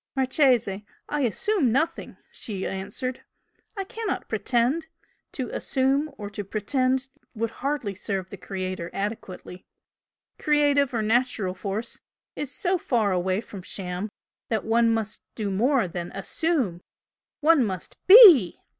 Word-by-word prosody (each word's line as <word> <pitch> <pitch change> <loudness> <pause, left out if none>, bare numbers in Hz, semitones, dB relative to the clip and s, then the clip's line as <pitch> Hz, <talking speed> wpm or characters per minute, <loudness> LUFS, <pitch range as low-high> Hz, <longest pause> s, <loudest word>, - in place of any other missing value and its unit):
"Marchese, 255 -7 +2 0.3
I 295 - -1
'assume' 270 - +1
nothing!" 320 +7 -1
she 195 -4 -5
answered 255 +7 -4 0.6
"I 390 - -1
cannot 435 0 -4
'pretend'! 245 +8 0 0.5
To 255 -4 -4
'assume' 270 +3 0
or 205 - -6
to 205 0 -5
'pretend' 255 +6 0 0.3
would 225 +1 -2
hardly 270 -7 -2
serve 190 -1 -4
the 200 - -7
Creator 185 -2 -5
adequately. 195 -3 -6 0.8
Creative 290 -2 +3
or 220 - 0
Natural 220 -4 +1
Force 205 +4 -5 0.3
is 295 - -4
so 365 +4 +1
far 225 -9 +1
away 185 +2 0
from 200 -4 -10
sham 180 +2 -4 0.4
that 220 -3 -1
one 230 +1 +3
must 220 -2 -2
do 210 -3 -3
more 235 +3 +2
than 175 0 -6
'assume' 205 - -1 0.6
one 310 -3 +5
must 190 -5 -5
BE!" 370 - +9
230 Hz, 130 wpm, -25 LUFS, 195-280 Hz, 0.8 s, BE